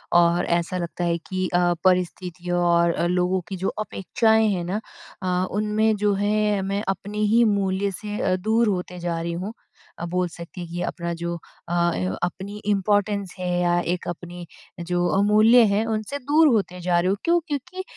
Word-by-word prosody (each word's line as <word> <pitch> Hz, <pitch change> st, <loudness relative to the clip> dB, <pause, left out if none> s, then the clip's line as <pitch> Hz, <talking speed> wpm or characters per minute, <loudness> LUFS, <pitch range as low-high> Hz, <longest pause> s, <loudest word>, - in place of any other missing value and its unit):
और 175 Hz, 0 st, +4 dB
ऐसा 180 Hz, +2 st, -4 dB
लगता 175 Hz, 0 st, -4 dB
है 170 Hz, -1 st, +1 dB
कि 185 Hz, -1 st, -1 dB
अ, 175 Hz, 0 st, +3 dB
परिस्थितियों 180 Hz, -1 st, 0 dB
और 170 Hz, -1 st, +3 dB
अ, 170 Hz, -, -1 dB
लोगों 180 Hz, +1 st, +1 dB
की 195 Hz, -, -5 dB
जो -, -, +1 dB, 0.2 s
अपेक्षाएँ 220 Hz, +3 st, +2 dB
हैं 180 Hz, -2 st, -2 dB
ना 200 Hz, +5 st, -2 dB, 0.4 s
अ, 180 Hz, 0 st, +1 dB
उनमें 215 Hz, +1 st, +2 dB
जो 205 Hz, -, +4 dB
है 210 Hz, -1 st, +1 dB
मैं 200 Hz, +2 st, -2 dB
अपने 205 Hz, +2 st, -4 dB, 0.2 s
ही 235 Hz, +1 st, +6 dB
मूल्य 195 Hz, 0 st, 0 dB
से 210 Hz, 0 st, -4 dB
अ, 185 Hz, -, +2 dB
दूर 220 Hz, +4 st, +1 dB
होते 180 Hz, -2 st, -2 dB
जा 170 Hz, -1 st, -2 dB
रही 170 Hz, 0 st, -3 dB
हूँ। 215 Hz, -, -5 dB, 0.5 s
अ, 170 Hz, -, -3 dB
बोल 180 Hz, +1 st, 0 dB
सकती 170 Hz, +1 st, -9 dB
हैं 170 Hz, -, -7 dB
कि 175 Hz, +1 st, -4 dB
अपना 170 Hz, -1 st, -3 dB
जो 170 Hz, 0 st, -3 dB, 0.3 s
अ, 175 Hz, 0 st, +2 dB
य 95 Hz, +1 st, -2 dB
अपनी 190 Hz, +3 st, -4 dB
इम्पोर्टेंस 205 Hz, -1 st, +1 dB
है 180 Hz, 0 st, -2 dB
या 175 Hz, 0 st, +2 dB, 0.2 s
एक 180 Hz, -, -5 dB
अपनी 175 Hz, 0 st, -7 dB, 0.3 s
जो 175 Hz, +1 st, -1 dB
अमूल्य 215 Hz, +4 st, +6 dB
हैं, 210 Hz, +3 st, +1 dB
उनसे 220 Hz, +4 st, -2 dB
दूर 295 Hz, +4 st, +4 dB
होते 180 Hz, -4 st, -1 dB
जा 175 Hz, 0 st, +2 dB
रही 175 Hz, -, 0 dB
हूँ। 195 Hz, -, +1 dB
क्यों? 345 Hz, +1 st, +3 dB
क्योंकि 305 Hz, +5 st, -4 dB
185 Hz, 185 wpm, -23 LUFS, 175-210 Hz, 0.5 s, ही